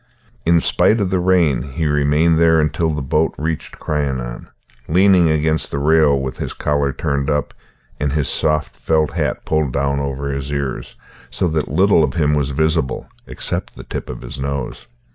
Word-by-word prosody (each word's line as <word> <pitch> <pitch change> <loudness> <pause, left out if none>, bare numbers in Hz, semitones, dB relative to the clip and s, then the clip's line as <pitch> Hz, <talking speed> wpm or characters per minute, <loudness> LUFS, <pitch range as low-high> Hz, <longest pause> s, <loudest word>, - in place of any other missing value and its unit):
In 85 0 +4
spite 110 +6 +2
of 95 -3 -1
the 95 - +1
rain 90 -7 +2
he 75 +3 -4
remained 75 +2 +2
there 80 -1 +5
until 80 +2 0
the 75 -2 -3
boat 75 +5 0
reached 80 +1 -4
Crianan, 65 -5 -3 0.4
leaning 90 0 +4
against 80 0 0
the - - -3
rail 75 -1 +3
with 65 -1 -4
his - - -4
collar 70 -1 0
turned 70 +1 -2
up 75 -1 -1 0.5
and 70 -2 -1
his 75 -3 0
soft 75 -3 0
felt 80 -2 +1
hat - - -2
pulled 80 -4 0
down 70 0 0
over 70 0 -3
his 70 +1 -4
ears, 70 -3 -4 0.3
so 90 +8 -1
that 80 -2 -1
little 90 +2 +4
of 75 +1 -1
him 75 -3 +2
was 75 -2 0
visible 80 -1 0 0.2
except - - -2
the - - -9
tip - - -6
of 60 - -7
his 65 +3 -8
nose. 70 -3 -4
75 Hz, 180 wpm, -19 LUFS, 70-80 Hz, 0.5 s, there